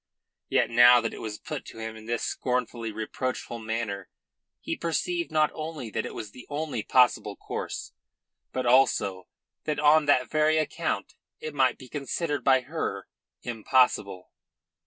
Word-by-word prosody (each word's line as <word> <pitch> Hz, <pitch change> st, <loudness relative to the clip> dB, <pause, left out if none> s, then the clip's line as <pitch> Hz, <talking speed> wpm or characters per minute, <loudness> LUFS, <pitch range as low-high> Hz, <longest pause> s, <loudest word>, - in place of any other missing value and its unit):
Yet -, -, +2 dB
now 120 Hz, +1 st, +8 dB
that 115 Hz, -1 st, -2 dB
it -, -, -8 dB
was 110 Hz, -2 st, -5 dB
put 150 Hz, -4 st, -6 dB
to -, -, -11 dB
him 110 Hz, 0 st, -5 dB
in 110 Hz, 0 st, -12 dB
this 120 Hz, 0 st, -1 dB
scornfully 125 Hz, -2 st, -2 dB
reproachful 115 Hz, +2 st, -4 dB
manner 110 Hz, -3 st, -3 dB, 0.5 s
he -, -, -3 dB
perceived 340 Hz, -, -1 dB
not 155 Hz, -1 st, +3 dB
only 155 Hz, -7 st, -6 dB
that -, -, -2 dB
it -, -, -9 dB
was 105 Hz, -2 st, -6 dB
the 125 Hz, -, -13 dB
only 145 Hz, -5 st, -2 dB
possible 125 Hz, +3 st, +3 dB
course, -, -, -5 dB, 0.6 s
but 130 Hz, -1 st, -2 dB
also 120 Hz, -7 st, +3 dB, 0.4 s
that 150 Hz, -1 st, -1 dB
on 150 Hz, +1 st, +5 dB
that 130 Hz, -3 st, +4 dB
very 155 Hz, 0 st, +3 dB
account 155 Hz, -, -1 dB, 0.3 s
it 155 Hz, -, -6 dB
might 135 Hz, -2 st, +2 dB
be 130 Hz, -, -12 dB
considered 145 Hz, +2 st, -2 dB
by 130 Hz, -1 st, +5 dB
her 125 Hz, -8 st, -4 dB, 0.4 s
impossible. 115 Hz, -5 st, +1 dB
125 Hz, 155 wpm, -27 LUFS, 115-150 Hz, 0.6 s, now